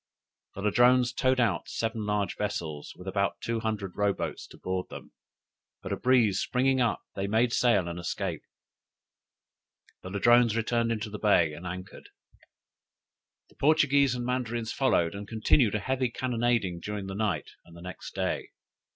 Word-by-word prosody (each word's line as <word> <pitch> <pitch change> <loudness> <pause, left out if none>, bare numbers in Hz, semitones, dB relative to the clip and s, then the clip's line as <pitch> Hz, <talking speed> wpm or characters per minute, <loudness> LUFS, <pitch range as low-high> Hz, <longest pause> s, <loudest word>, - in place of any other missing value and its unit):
The 95 - -6
Ladrones 120 +4 +4
towed 130 -1 +2
out 105 -8 +1
seven 110 -2 -3
large 105 -2 0
vessels, 80 -8 -4
with 90 - -12
about 100 +1 -1
two 115 0 -2
hundred 105 -4 -3
row 100 -1 +2
boats 85 -4 -5
to - - -15
board 95 0 -3
them: - - -10 0.7
but - - -5
a - - +1
breeze 125 -6 +3
springing 130 +1 +1
up, 120 - +1
they 100 0 -2
made 115 +3 +2
sail 115 -8 +3
and 85 0 -5
escaped. 85 - -4 1.5
The 90 - -8
Ladrones 120 +3 +4
returned 115 +1 +1
into 110 -2 -3
the 105 - -6
bay, 85 -7 +3
and 85 +4 -8
anchored. 90 +1 -8 1.4
The - - -23
Portuguese 140 -3 +4
and 120 -1 -3
Mandarins 120 -3 -2
followed, 85 -11 +2
and 100 +1 -7
continued 110 0 +2
a - - +1
heavy 130 +3 -1
cannonading 120 -7 0
during 105 +2 -5
that 95 - -5
night 110 -1 -1
and 85 0 -15
the - - -11
next 90 -1 -8
day. - - -2
110 Hz, 160 wpm, -28 LUFS, 95-120 Hz, 1.5 s, Ladrones